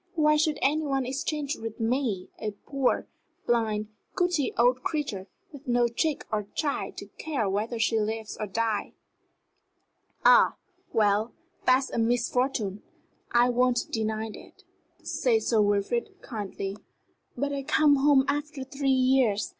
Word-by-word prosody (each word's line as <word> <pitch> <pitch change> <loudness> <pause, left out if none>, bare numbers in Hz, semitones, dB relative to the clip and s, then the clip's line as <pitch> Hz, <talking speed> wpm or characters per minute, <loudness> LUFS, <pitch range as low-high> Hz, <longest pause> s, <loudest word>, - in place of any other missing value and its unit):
"Why 305 -2 +4
should 300 -1 +1
any 305 +3 +2
one 270 -3 0
exchange 285 +2 -2
with 225 0 -7
me 225 -5 -1
a 215 -1 -3
poor, 275 -2 0 0.4
blind, 215 -3 0 0.3
gouty 355 -6 +1
old 245 +2 +3
creature, 255 - -3 0.2
with 285 -1 -12
no 240 -1 +3
chick 290 +6 -1
or 210 -2 -1
child 290 -2 -2
to - - -6
care 275 -10 -1
whether 210 +5 -1
she 225 0 +2
lives 220 0 -3
or 215 - -2
dies?" 220 +1 -1 1.3
"Ah, - - +6 0.4
well, 215 0 +2 0.3
that's 260 +1 +4
a - - -1
misfortune 240 -3 0 0.5
I 240 +1 +4
won't 245 0 +1
deny 220 0 -2
that," - - -14 0.4
said 460 -3 +1
Sir 225 -3 +3
Wilfrid, 205 +3 0
kindly. 200 -2 -5 0.6
"But 285 +3 -1
I 280 - -2
come 295 0 +4
home 275 -1 +4
after 290 -1 -2
three 275 +1 -2
years. 260 - +3
245 Hz, 140 wpm, -27 LUFS, 220-280 Hz, 1.3 s, Ah